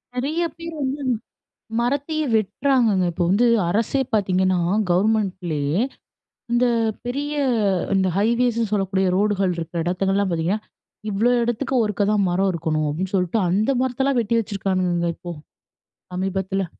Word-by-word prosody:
நெறைய 305 +7 -1
பேர் 330 0 -7
வந்து 270 -1 -1 0.9
மரத்தையே 285 +5 -1
வெட்டுறாங்கங்க. 220 -1 +2
இப்போ 175 +1 -1
வந்து 215 +6 +3 0.2
அரசே 230 +7 +1
பார்த்தீங்கன்னா, 185 -2 +2 0.3
கவர்மெண்ட்லேயே 180 -5 +1 0.7
இந்த 240 +1 +3 0.4
பெரிய 285 +4 -2 0.6
இந்த 190 -1 +2
ஹைவேஸ்ன்னு 230 0 +1
சொல்லக்கூடிய 195 -1 +1
ரோடுகள் 200 -2 +1
இருக்க 170 0 -3
இடத்துங்கல்லாம் 195 +3 0
பார்த்தீங்கன்னா, 170 +6 0 0.5
"இவ்வளோ 220 +5 +2
இடத்துக்கு 240 +3 -1
ஒருக்கா 210 -1 0
தான் 205 -2 +2
மரம் 190 +2 +1
இருக்கணும்." 155 -2 -1
அப்படீன்னு 185 +6 -2
சொல்ட்டு, 180 +4 +1
அந்த 210 +9 +2
மரத்தல்லாம் 260 +1 +1
வெட்டி 230 +1 0
வச்சிருக்கானுங்கங்க 185 -5 -1
இப்போ, 175 -1 -7 0.8
சமீபத்தில. 190 +1 -1
200 Hz, 120 wpm, -22 LUFS, 185-240 Hz, 0.9 s, வந்து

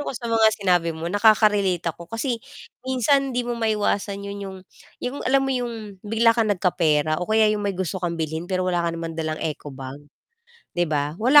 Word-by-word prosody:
ako - - -3
sa 240 - -8
mga 225 -1 +4
sinabi 180 -4 +2
mo 160 - -6
nakaka-relate 205 -4 +4
ako, 170 +1 -13
kasi 230 +1 -2 0.4
minsan 260 +2 +2
hindi 245 -1 -1
mo 240 - -2
maiwasan 205 -2 0
'yon 200 0 -6
'yong 190 -1 -7 0.5
'yong 255 +3 -3
alam 270 +1 +4
mo 270 - 0
'yong 225 -6 -4
bigla 225 +3 +3
kang 230 -2 +1
nagkapera 160 -5 +1
o 180 - -4
kaya 220 0 +4
'yong 210 - -2
may 200 -2 -2
gusto 185 0 -3
kang 170 -1 -2
bilhin 160 +1 -3
pero 185 -1 0
wala 180 -1 +1
ka 170 - 0
naman 165 0 -4
dalang 160 -1 -3
eco 155 -2 -4
bag, 135 0 -8 0.8
'di 175 - +3
ba, 150 -1 -1
wala 255 +8 +7
200 Hz, 200 wpm, -23 LUFS, 170-225 Hz, 0.8 s, wala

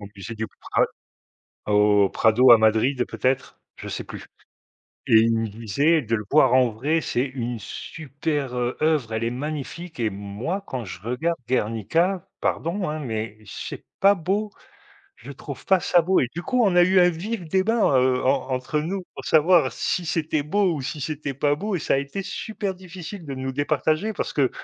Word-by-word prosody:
au 100 - -8
musée 100 +4 -7
du 110 0 -3
Pra - - +1 0.8
au 105 -1 +4
Prado 120 +3 +5
à 115 - +10
Madrid 110 +4 +2
peut-être, 130 0 -1 0.2
je - - -8
sais - - -4
plus, - - -9 0.8
et 110 - +7
il 115 0 +3
me 115 -1 -1
disait 115 +10 +1
de 115 0 -2
le 105 - -5
voir 135 -4 +5
en 130 -2 +5
vrai, 145 +9 0
c'est 125 +2 0
une 120 -3 -4
super, 145 +1 -4
heu, 125 0 -1
œuvre, 150 -8 +1
elle 110 +1 -1
est 115 - 0
magnifique, 155 +4 -6
et 115 - +2
moi, 100 - -4
quand 125 -3 -4
je 90 -1 -8
regarde 140 +9 -1
Guernica, 130 - 0
pardon, 180 +2 -1
hein, 155 +1 -3
mais 110 -5 -4
c'est - - -7 0.2
pas 200 +1 +6
beau, 200 +4 -1 0.7
je - - -10
trouve - - -9
pas 190 -2 +4
ça 175 -1 +3
beau, 185 +3 +3
et 125 - 0
du 175 - -4
coup, 250 +5 +1
on 190 -4 +2
a 175 - +7
eu 185 +1 +4
un 180 0 +5
vif 185 +2 -5
débat, 190 - +2
heu, 130 0 +2
en 135 - +1
entre 130 +4 -1
nous 185 +4 -3
pour - - -8
savoir 155 -4 +4
si 175 +7 -2
c'était 155 -2 0
beau 195 +3 +2
ou 140 - -4
si 150 +3 -5
c'était 145 -1 -4
pas 145 +2 +1
beau, 205 +3 -3
et - - -4
ça - - +1
a - - +2
été 140 +8 -4
super 200 -1 -4
difficile 180 -1 -9
de 135 - -4
nous 130 0 -4
départager 155 +8 0
parce - - -3
que, 135 -4 +2
145 Hz, 195 wpm, -24 LUFS, 120-175 Hz, 0.8 s, à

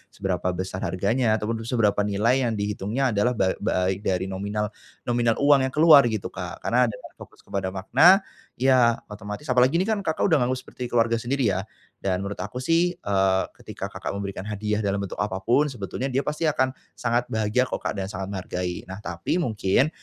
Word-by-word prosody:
seberapa 90 -1 -2
besar 95 +1 -4
harganya 110 +6 +1
ataupun 110 +1 -2
seberapa 110 -5 +2
nilai 115 +6 +2
yang 115 - -1
dihitungnya 105 +5 -1
adalah 110 +4 +1
ba 95 -4 +2
ba - - -1 0.2
baik 95 - -4
dari 95 -2 0
nominal 105 +2 -3 0.3
nominal 120 -1 +1
uang 140 -2 +5
yang 130 - -8
keluar 150 -4 +7
gitu 110 -4 -3
Kak, - - -7
karena 125 +1 +3
ada 110 - -4 0.2
fokus - - -14
kepada 95 -1 -3
makna, 130 - +5 0.3
ya 125 -3 +4 0.2
otomatis 105 +4 -7
apalagi 125 +4 +4
ini 175 - +3
kan 215 +1 0
Kakak, 160 -5 -1
udah 160 -6 +4
nganggep 125 +1 +1
seperti 125 - -7
keluarga 115 -1 +2
sendiri 125 -2 0
ya, 95 +2 -3 0.3
dan 95 -1 -1
menurut 100 +1 -5
aku 105 +6 -5
sih, 170 +4 +2
eee, 95 - +1
ketika - - -7
Kakak, - - -5
memberikan 100 -1 -5
hadiah 105 0 -2
dalam 100 0 0
bentuk 100 - -6
apa 100 -2 -2
pun 120 +9 +3
sebetulnya 125 -2 -4
dia 130 +2 +1
pasti 150 +3 -2
akan 145 -4 +2 0.2
sangat 120 0 0
bahagia 110 +3 +1
kok - - -4
Kak, - - -2
dan 95 - -2
sangat 95 -1 -5
menghargai 90 -2 -4 0.2
tapi 85 - -2
mungkin, 110 - +1
110 Hz, 190 wpm, -25 LUFS, 100-130 Hz, 0.3 s, keluar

